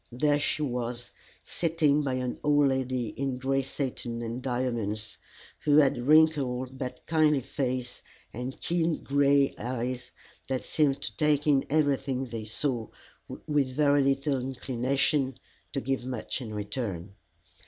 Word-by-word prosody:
There 145 Hz, +4 st, +2 dB
she 150 Hz, +1 st, 0 dB
was, 120 Hz, -2 st, -3 dB, 0.3 s
sitting 155 Hz, -3 st, +2 dB
by 135 Hz, -3 st, -1 dB
an 125 Hz, -1 st, -3 dB
old 145 Hz, -1 st, +4 dB
lady 130 Hz, -3 st, -1 dB
in 135 Hz, +1 st, -3 dB
gray 135 Hz, +1 st, +1 dB
satin 125 Hz, -3 st, -4 dB
and 115 Hz, +2 st, -4 dB
diamonds, 120 Hz, -5 st, -2 dB, 0.4 s
who 145 Hz, -1 st, +3 dB
had 140 Hz, -3 st, +5 dB
a -, -, -4 dB
wrinkled 135 Hz, -4 st, +3 dB
but 125 Hz, -1 st, -6 dB
kindly 155 Hz, -3 st, +3 dB
face 125 Hz, -1 st, -3 dB, 0.3 s
and 125 Hz, +3 st, -5 dB
keen 170 Hz, -1 st, 0 dB
gray 140 Hz, 0 st, +3 dB
eyes 125 Hz, 0 st, -3 dB, 0.4 s
that 130 Hz, -1 st, -2 dB
seemed 145 Hz, -3 st, +1 dB
to 110 Hz, -, -4 dB
take 150 Hz, -1 st, +2 dB
in 140 Hz, -3 st, +3 dB
everything 140 Hz, -3 st, +1 dB
they 115 Hz, -3 st, -6 dB
saw, 115 Hz, +1 st, -1 dB, 0.6 s
with 140 Hz, -4 st, 0 dB
very 145 Hz, -1 st, +4 dB
little 135 Hz, 0 st, +1 dB
inclination 135 Hz, +1 st, 0 dB, 0.3 s
to -, -, -1 dB
give 135 Hz, +1 st, -2 dB
much 125 Hz, 0 st, -4 dB
in 115 Hz, -4 st, -6 dB
return. 105 Hz, -3 st, -4 dB
130 Hz, 140 wpm, -28 LUFS, 125-145 Hz, 0.6 s, had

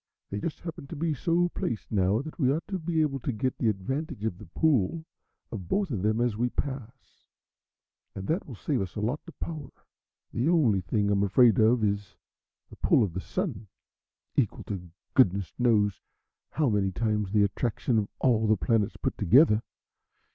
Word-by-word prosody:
"They 100 Hz, -, -2 dB
just 160 Hz, +7 st, -4 dB
happen 165 Hz, -4 st, -7 dB
to 165 Hz, -, -7 dB
be 160 Hz, +1 st, 0 dB
so 170 Hz, +4 st, +1 dB
placed 115 Hz, -9 st, -4 dB
now 100 Hz, +3 st, +2 dB
that 155 Hz, +2 st, -9 dB
we 130 Hz, -3 st, +3 dB
ought 155 Hz, +4 st, -2 dB
to 190 Hz, -2 st, -2 dB
be 160 Hz, -1 st, 0 dB
able 135 Hz, -3 st, -1 dB
to 130 Hz, -, -2 dB
get 130 Hz, +3 st, -1 dB
the 115 Hz, -, +2 dB
advantage 110 Hz, +4 st, -3 dB
of 95 Hz, -5 st, -2 dB
the 105 Hz, -, -11 dB
pull 160 Hz, -, +1 dB, 0.5 s
of 95 Hz, -6 st, -6 dB
both 195 Hz, -, 0 dB
of 105 Hz, -7 st, -2 dB
them 110 Hz, +3 st, +1 dB
as 120 Hz, -3 st, +1 dB
we 120 Hz, +3 st, 0 dB
pass, 130 Hz, -2 st, -6 dB, 0.9 s
and 95 Hz, -, -6 dB
that 170 Hz, +6 st, -1 dB
will 130 Hz, -, -8 dB
save 130 Hz, +3 st, -1 dB
us 95 Hz, -2 st, -5 dB
a -, -, -3 dB
lot 120 Hz, +8 st, -1 dB
of 170 Hz, -, -13 dB
power. 155 Hz, -5 st, -5 dB, 0.6 s
The 125 Hz, +7 st, +1 dB
only 130 Hz, -, +3 dB
thing 100 Hz, +2 st, 0 dB
I'm 100 Hz, -1 st, +2 dB
afraid 105 Hz, +2 st, +5 dB
of 110 Hz, +1 st, +4 dB
is 100 Hz, -1 st, -1 dB, 0.6 s
the -, -, -12 dB
pull -, -, +4 dB
of 95 Hz, -6 st, -2 dB
the 95 Hz, -, -3 dB
Sun, 110 Hz, -, -3 dB, 0.7 s
equal -, -, 0 dB
to 90 Hz, -3 st, -6 dB, 0.2 s
goodness 100 Hz, -, +3 dB
knows 105 Hz, -5 st, +2 dB, 0.5 s
how 155 Hz, -2 st, 0 dB
many 100 Hz, -4 st, +1 dB
times 105 Hz, -1 st, -1 dB
the 105 Hz, -1 st, +4 dB
attraction 110 Hz, +3 st, 0 dB
of 100 Hz, -, -2 dB
all 110 Hz, -4 st, +2 dB
the 110 Hz, 0 st, +4 dB
planets 105 Hz, +6 st, +1 dB
put -, -, -2 dB
together. 110 Hz, -, +5 dB
115 Hz, 190 wpm, -28 LUFS, 100-140 Hz, 0.9 s, afraid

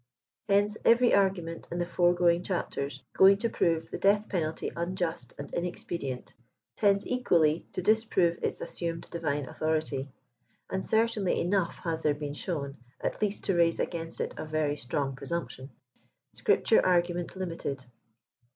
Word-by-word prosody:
Hence, 205 Hz, +2 st, +3 dB
every 240 Hz, +1 st, +5 dB
argument 180 Hz, -4 st, +1 dB
in 175 Hz, -, -3 dB
the 175 Hz, -, 0 dB
foregoing 175 Hz, 0 st, +3 dB
chitpters, 140 Hz, -7 st, -3 dB
going 195 Hz, +1 st, +7 dB
to 230 Hz, +3 st, -1 dB
prove 165 Hz, -1 st, 0 dB
the -, -, -4 dB
death 205 Hz, +2 st, +3 dB
penalty 160 Hz, -4 st, -2 dB
unjust 170 Hz, -7 st, -3 dB
and 140 Hz, -, -8 dB
inexpedient, 170 Hz, -6 st, -4 dB, 0.4 s
tends 200 Hz, -1 st, +3 dB
equally 170 Hz, -11 st, +2 dB
to 185 Hz, -, -3 dB
disprove 200 Hz, -5 st, +2 dB
its -, -, -2 dB
assumed 165 Hz, -1 st, -4 dB
divine 150 Hz, -4 st, -1 dB
authority; 155 Hz, -1 st, -2 dB, 0.6 s
and 190 Hz, 0 st, -1 dB
certainly 220 Hz, -3 st, +1 dB
enough 180 Hz, -1 st, 0 dB
has 165 Hz, -2 st, -1 dB
there 150 Hz, -1 st, +2 dB
been 145 Hz, -1 st, -5 dB
shown, 145 Hz, -3 st, -4 dB, 0.2 s
at -, -, -3 dB
least 210 Hz, -1 st, -1 dB
to 195 Hz, -, +1 dB
raise 170 Hz, -1 st, +3 dB
against 165 Hz, -1 st, -3 dB
it -, -, -2 dB
a -, -, -4 dB
very 155 Hz, -2 st, 0 dB
strong 135 Hz, 0 st, -2 dB
presumption. 135 Hz, -2 st, -5 dB, 0.6 s
SCRIPTURE -, -, +3 dB
ARGUMENT 175 Hz, -1 st, +1 dB
LIMITED." 165 Hz, -8 st, -4 dB
170 Hz, 140 wpm, -29 LUFS, 155-190 Hz, 0.6 s, going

